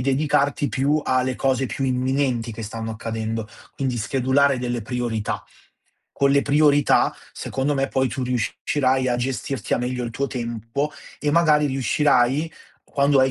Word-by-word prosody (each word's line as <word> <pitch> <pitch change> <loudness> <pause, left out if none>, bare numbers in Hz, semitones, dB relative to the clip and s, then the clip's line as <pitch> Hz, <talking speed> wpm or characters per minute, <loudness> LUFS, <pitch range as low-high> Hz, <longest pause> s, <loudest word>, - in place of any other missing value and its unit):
dedicarti 140 +1 +1
più 145 +3 +1
alle 130 0 +1
cose 130 0 +1
più 135 - -3
imminenti 130 -2 0
che 115 - -7
stanno 110 +1 -5
accadendo, 110 -1 -4 0.3
quindi 130 -3 -2
schedulare 130 +4 +2
delle 120 -1 -2
priorità. 115 -2 -2 0.7
Con 140 0 +2
le 140 0 +4
priorità 145 0 +4 0.2
secondo 135 +2 -2
me 135 0 +1
poi 130 -1 +1
tu 130 - -4
riuscirai 130 +2 0
a 120 - +1
gestirti 130 +1 -3
al - - -1
meglio 125 0 -2
il 115 - -4
tuo 140 +4 -2
tempo 120 +3 -3 0.3
e 150 - +1
magari 155 -2 +4
riuscirai, 135 +2 +2 0.3
quando 140 0 +2
hai 130 0 +3
130 Hz, 150 wpm, -23 LUFS, 120-140 Hz, 0.7 s, le